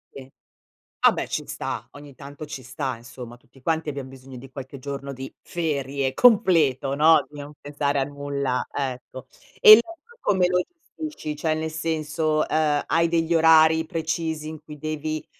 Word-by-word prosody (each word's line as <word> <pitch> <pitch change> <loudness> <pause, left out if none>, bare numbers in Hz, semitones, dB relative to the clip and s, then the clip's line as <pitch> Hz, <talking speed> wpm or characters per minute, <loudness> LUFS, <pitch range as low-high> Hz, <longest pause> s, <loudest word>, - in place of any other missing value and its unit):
Sì. 135 0 -11 0.7
Vabbè - - +3
ci - - -3
sta, - - -5
ogni 145 -2 -13
tanto 145 +2 -9
ci 140 -3 -8
sta 130 +1 -4
insomma. 120 0 -11
Tutti 135 +2 -23
quanti 160 +2 -1
abbiam 140 -2 -6
bisogno 130 -1 -12
di 135 +1 -11
qualche 135 +1 -8
giorno 140 +1 -6
di 135 0 -8
ferie 140 -5 -2
completo, 165 - +4
no, 155 +1 +5
di 145 0 -11
non 145 +1 -9
pensare 145 -1 -1
a - - +2
nulla, 140 -2 -3
ecco. 130 -2 -5 0.3
E 215 - +9
il 215 +2 +11
resto 385 - -15
come 185 -2 +2
lo 180 0 +2 0.5
gestisci? 155 - -5
Cioè 155 0 0
nel 160 0 -3
senso, 155 -1 -1
uhm, 150 -2 +1
hai 165 +1 +2
degli 165 0 +1
orari 160 0 +5
precisi 160 -2 -3
in 155 -1 -8
cui 150 -1 -11
devi, 155 +1 -4
150 Hz, 170 wpm, -24 LUFS, 135-160 Hz, 0.7 s, il